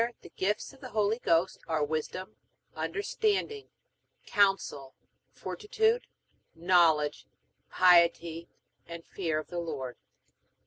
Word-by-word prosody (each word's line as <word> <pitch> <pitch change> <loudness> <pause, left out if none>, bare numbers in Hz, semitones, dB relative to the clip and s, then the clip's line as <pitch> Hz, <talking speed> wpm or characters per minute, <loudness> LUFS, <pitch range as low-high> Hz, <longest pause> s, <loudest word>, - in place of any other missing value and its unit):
The - - -11
gifts 210 +7 -2
of 270 - -19
the 255 - -8
Holy 215 +1 +1
Ghost 170 -2 +1
are 160 -2 0
Wisdom, 170 +6 -4 0.4
Understanding, 425 -1 -1 0.6
Counsel, 195 -9 +1 0.4
Fortitude, 445 +1 -1 0.5
Knowledge, 165 -4 +3 0.4
Piety 170 -2 +4 0.4
and 170 0 -9
Fear 165 -5 -2
of 155 - -5
the 175 - -3
Lord. 140 -7 -5
175 Hz, 100 wpm, -29 LUFS, 160-220 Hz, 0.6 s, Piety